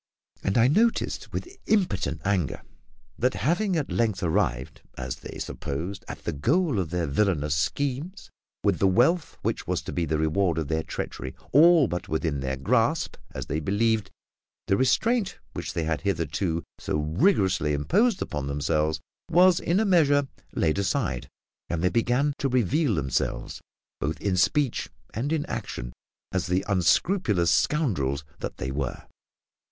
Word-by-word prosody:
and 95 - 0
I 120 +1 +6
noticed, 225 - +1
with 375 +2 -6
impotent 95 - +1
anger, 95 -9 0 0.6
that, 125 +2 +2
having 180 +6 +1
at 155 -4 -1
length 110 -5 0
arrived, 65 -7 0 0.2
as - - -4
they - - -9
supposed, 90 +8 -5
at - - -8
the - - -1
goal 140 - +1
of 90 -4 -2
their 90 0 -1
villainous 75 -1 +1
schemes, 140 - -2 0.3
with 100 -5 +2
the 95 - +4
wealth 130 - +2
which - - -2
was - - -1
to - - -6
be 85 - 0
the 80 0 0
reward 80 +2 +1
of 80 -3 -2
their 80 0 +1
treachery 65 -4 -5 0.2
all 160 0 +7
but 90 -2 -4
within 80 -2 -1
their 65 0 -2
grasp, 65 - +1 0.2
as - - -4
they 75 - -2
believed, 105 +4 +1 0.6
the 95 - +2
restraint 215 - +2 0.2
which - - -5
they 85 -1 -1
had 80 0 -1
hitherto 85 -2 -1 0.2
so - - -1
rigorously 90 - +2
imposed 185 - +2
upon 75 -2 -4
themselves 75 +2 0 0.3
was 180 +1 +5
in 175 +4 +1
a 220 - +2
measure 145 -7 +4 0.3
laid 80 +3 +1
aside, 65 -10 -1 0.4
and 85 0 -2
they 90 - +4
began 125 +5 +2
to 140 - 0
reveal 125 - +2
themselves, 70 -4 -2 0.4
both 75 +2 -2
in 100 -2 0
speech 130 +7 +1 0.2
and 130 +7 -2
in 155 -2 0
action, - - -5 0.4
as 95 -2 -1
the 90 +2 0
unscrupulous 95 - +2
scoundrels 75 - +1 0.2
that - - -5
they 65 - -3
were. 70 -2 -3
95 Hz, 155 wpm, -26 LUFS, -, 0.6 s, all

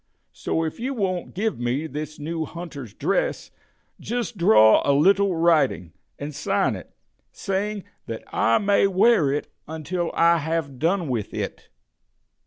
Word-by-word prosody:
So 165 - -2
if 160 +5 -4
you 265 +3 -3
won't 185 -7 -2
give 215 - -1
me 125 +5 -1
this 155 +1 -6
new 160 +2 -3
hunter's 155 - -8
dress, - - -1 0.5
just 240 0 -3
draw 110 - +6
a 140 - +3
little 195 +5 +3
writing, 155 - +2 0.2
and 145 +1 -6
sign 145 - 0
it, - - -10 0.4
saying 200 +1 -3 0.2
that 115 -1 -6
I 115 - +3
may 200 -1 +3
wear 190 -5 +3
it 145 - -3 0.2
until 160 +3 -3
I 170 0 +4
have 155 -4 -3
done 170 +1 +1
with 115 -6 -3
it." - - -5
165 Hz, 145 wpm, -24 LUFS, 145-195 Hz, 0.5 s, draw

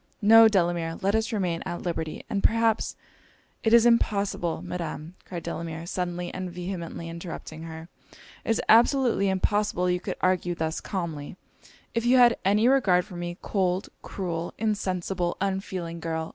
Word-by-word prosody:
No, 225 +2 +9
Delamere 175 -5 +1
let 195 +1 +2
us 220 +2 +1
remain 180 -6 -1
at 175 - -5
liberty, 160 -3 -4
and 200 - -1
perhaps 225 0 +2 0.3
' - - -35
'It 225 - +2
is 235 0 +7
impossible, 200 -7 +1
Madam!' 165 -2 -5
cried 170 -2 -6
Delamere, 165 0 -5
suddenly 175 0 -3
and 185 -1 -4
vehemently 175 -2 -5
interrupting 165 -1 -7
her 160 0 -8 0.6
'It - - -7
is 225 - +2
absolutely 235 -3 +4
impossible 190 -1 +1
you 180 - 0
could - - -4
argue 180 -1 +1
thus 160 -1 -2
calmly, 170 -4 -5 0.6
if 230 - 0
you 245 +2 +4
had 240 -2 +6
any 210 +4 +3
regard 205 -10 +4
for 200 -4 -11
me 175 0 -5
Cold 185 -1 0
cruel 170 -3 -4
insensible 185 -4 -1
unfeeling 190 -3 -3
girl! 160 0 -3
180 Hz, 155 wpm, -26 LUFS, 170-210 Hz, 0.6 s, No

